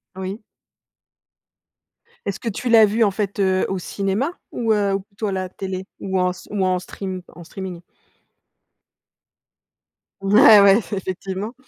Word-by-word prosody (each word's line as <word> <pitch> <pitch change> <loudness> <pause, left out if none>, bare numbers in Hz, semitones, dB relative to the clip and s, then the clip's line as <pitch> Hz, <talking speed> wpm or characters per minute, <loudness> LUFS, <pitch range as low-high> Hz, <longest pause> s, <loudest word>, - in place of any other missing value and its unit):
Oui. 190 +3 -5 1.9
Est-ce 200 +1 -3
que 230 - -3
tu 240 +4 -4
l'as 225 -2 +8
vu 225 +3 +2
en 205 - +3
fait, 200 0 -3
heu, 190 -1 +2
au 190 - -1
cinéma 200 - -2 0.2
ou, 225 -2 0
heu, 200 -2 +1
ou - - -1
plutôt 205 +1 -6
à - - -1
la 185 -1 -2
télé 190 0 -6
ou 190 -1 -2
en 180 0 +2
s 180 - -12
ou 195 -2 0
en 185 -1 +1
stream 185 0 -6
en 175 - -13
streaming? 180 0 -7 2.4
Ouais, 210 +1 +7
ouais, 200 +1 +7 0.2
effectivement. 190 +3 -4
195 Hz, 150 wpm, -21 LUFS, 185-210 Hz, 2.4 s, l'as